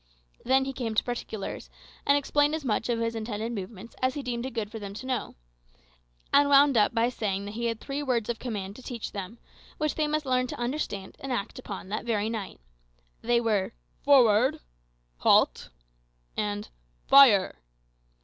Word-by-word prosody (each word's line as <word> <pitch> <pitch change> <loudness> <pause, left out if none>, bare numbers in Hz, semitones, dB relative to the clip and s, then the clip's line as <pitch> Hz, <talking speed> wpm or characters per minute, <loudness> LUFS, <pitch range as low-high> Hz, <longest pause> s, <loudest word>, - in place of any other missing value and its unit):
Then 265 +1 +3
he 270 - -4
came 230 -4 -3
to - - +3
particulars, 230 -4 -5 0.4
and 280 - +5
explained 290 +1 +2
as 315 -3 -6
much 225 0 0
of 235 - +1
his 230 0 -1
intended 225 0 -4
movements 205 +1 -7
as 255 0 +1
he 290 - -4
deemed 245 0 -3
it 265 - -9
good 215 -2 -3
for 225 - -6
them 200 -1 -7
to 255 - -7
know; 255 -2 -3 1.0
and 285 0 +5
wound 280 -1 +6
up 215 +1 +3
by 230 +1 +3
saying 200 -5 -2
that 205 - -6
he 235 +2 -3
had 230 -1 -1
three 280 +4 -4
words 245 -6 0
of 235 -2 -3
command 205 -5 -5
to - - -11
teach 240 -3 -6
them, 200 +3 -6 0.4
which 305 -1 0
they 305 -1 0
must 305 0 -1
learn 255 -1 +1
to - - -6
understand 240 -6 -3
and 270 - -5
act 235 0 -3
upon 200 -6 -7
that 210 0 -3
very 220 -2 -1
night. 210 - -5 0.6
They 240 +1 +2
were, 215 -5 0 0.3
"Forward!" 250 -4 +5 0.6
"Halt!" - - +3 0.7
and 205 0 -3 0.4
"Fire!" 235 - +6
235 Hz, 180 wpm, -27 LUFS, 210-265 Hz, 1.0 s, wound